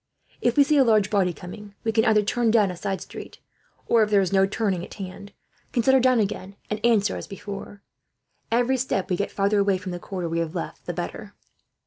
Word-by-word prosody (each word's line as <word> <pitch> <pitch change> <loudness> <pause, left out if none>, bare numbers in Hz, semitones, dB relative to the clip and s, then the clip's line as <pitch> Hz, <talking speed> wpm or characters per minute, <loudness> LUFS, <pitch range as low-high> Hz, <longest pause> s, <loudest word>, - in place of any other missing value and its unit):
If 240 +1 +1
we 285 - +8
see 300 +1 +2
a 275 - +7
large 215 -4 +3
body 195 -4 +2
coming, 200 +4 -10
we 225 - +1
can 220 0 +2
either 215 -1 +4
turn 230 +3 +1
down 215 -4 +4
a - - -7
side 195 +2 -3
street - - -9 0.5
or, 230 - +4
if 215 - +2
there 205 -1 +4
is 190 -1 0
no 195 0 +4
turning 195 -4 -1
at - - -10
hand, 200 0 -8 0.4
can 235 - +1
set 265 - +4
her 265 - +6
down 255 -1 +4
again 195 -1 -2 0.2
and 210 0 -3
answer 215 -4 +3
as - - -7
before. 200 0 -8 0.7
Every 245 +3 +2
step 235 -8 -1
we - - +3
get, 200 - -2
farther 200 +1 +1
away 200 -1 +2
from 185 0 -6
the 175 - -5
quarter 180 -1 -4
we 165 0 -1
have 165 +1 -3
left, 170 - -6
the - - -2
better." - - -6
205 Hz, 235 wpm, -24 LUFS, 190-225 Hz, 0.7 s, we